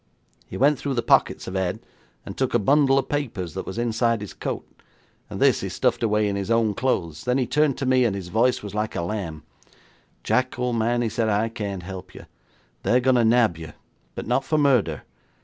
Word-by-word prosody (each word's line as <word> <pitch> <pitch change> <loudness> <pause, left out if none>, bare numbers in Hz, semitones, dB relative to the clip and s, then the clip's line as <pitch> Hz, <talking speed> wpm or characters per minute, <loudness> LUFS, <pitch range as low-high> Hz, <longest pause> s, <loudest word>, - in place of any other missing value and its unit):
He - - -7
went 140 +1 +3
through 140 -2 -2
the 120 - 0
pockets - - +2
of 95 - -5
Ed, 95 -2 -1 0.5
and 100 - -7
took 130 -2 -1
a - - +7
bundle 135 +4 +3
of 135 - 0
papers 110 - -3
that - - -6
was 95 - -6
inside 115 -1 0
his 105 - -7
coat, - - -5 0.6
and - - -6
this - - +3
he - - -3
stuffed - - 0
away 105 -2 +2
in 100 - -1
his 100 +1 -3
own 115 -2 +2
clothes. 85 -10 -2
Then 125 +1 +1
he 130 - +1
turned 150 +2 +1
to 135 - -3
me, 130 0 +3
and 110 -5 +1
his 95 -3 -6
voice 120 +5 +1
was 100 -1 -7
like 105 +1 -2
a - - -1
lamb. 85 -5 -4 0.8
'"Jack, 130 -1 0
old 125 -1 -1
man," 120 +2 +1
he 115 - 0
said, 110 0 -1
"I 105 +2 +1
can't 100 -5 -5
help 95 0 -9
you. - - -11 0.6
They're 125 - +3
going 130 0 +3
to 120 - +3
nab 115 -7 +3
you, 80 -2 -9 0.4
but - - -5
not 135 - +1
for 155 - 0
murder. 125 - +2
115 Hz, 220 wpm, -24 LUFS, 100-125 Hz, 0.8 s, a